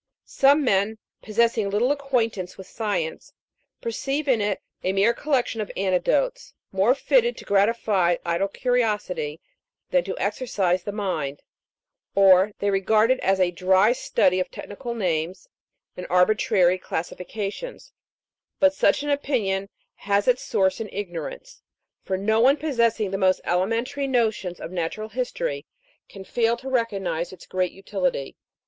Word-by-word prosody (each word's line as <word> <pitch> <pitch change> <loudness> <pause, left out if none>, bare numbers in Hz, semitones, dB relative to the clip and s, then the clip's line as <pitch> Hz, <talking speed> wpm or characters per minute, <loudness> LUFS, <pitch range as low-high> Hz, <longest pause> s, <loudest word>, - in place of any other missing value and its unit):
Some 285 +2 +4
men, 205 -2 +1 0.2
possessing 225 -1 +1
little 220 +7 +2
acquaintance 230 -10 -1
with 190 - -9
science, 190 -8 -3 0.5
perceive 275 +6 -2
in 245 -5 +3
it 205 -1 -1 0.2
a 185 - 0
mere 200 +4 +3
collection 250 -5 -1
of 210 - -5
anecdotes, 195 - 0 0.2
more 195 +7 +3
fitted 485 - +2
to - - -10
gratify 200 -3 +2
idle 170 +3 0
curiosity 245 - -1 0.5
than - - +3
to - - -4
exercise 185 -8 0
the 205 - -5
mind; 185 -9 -3 0.7
or 195 0 +6
they 200 0 0
regard 215 +4 +3
it 260 - +2
as 195 0 +1
a 180 -1 +3
dry 190 +4 +3
study 185 -6 +1
of 185 - -2
technical 235 +3 -7
names 180 - -2 0.5
and 180 - -7
arbitrary 180 -1 +3
classifications; 200 - -5 0.7
but 285 0 +5
such 290 - +2
an 290 - -1
opinion 210 -9 -1 0.3
has 200 +2 0
its 250 0 +3
source 190 +3 +1
in 220 -2 -5
ignorance, 205 - -6 0.4
for 190 - -2
no 220 +3 +1
one 265 +5 +5
possessing 235 -9 0
the 195 - -2
most 185 -1 +3
elementary 230 +10 -1
notions 220 -8 0
of 165 - -7
natural 185 +5 -3
history 255 - -3 0.4
can 195 - -10
fail 230 +4 +1
to 265 +2 -7
recognise 195 -9 -1
its 185 - -12
great 185 -1 -1
utility. 185 -7 -3
210 Hz, 140 wpm, -24 LUFS, 185-250 Hz, 0.7 s, or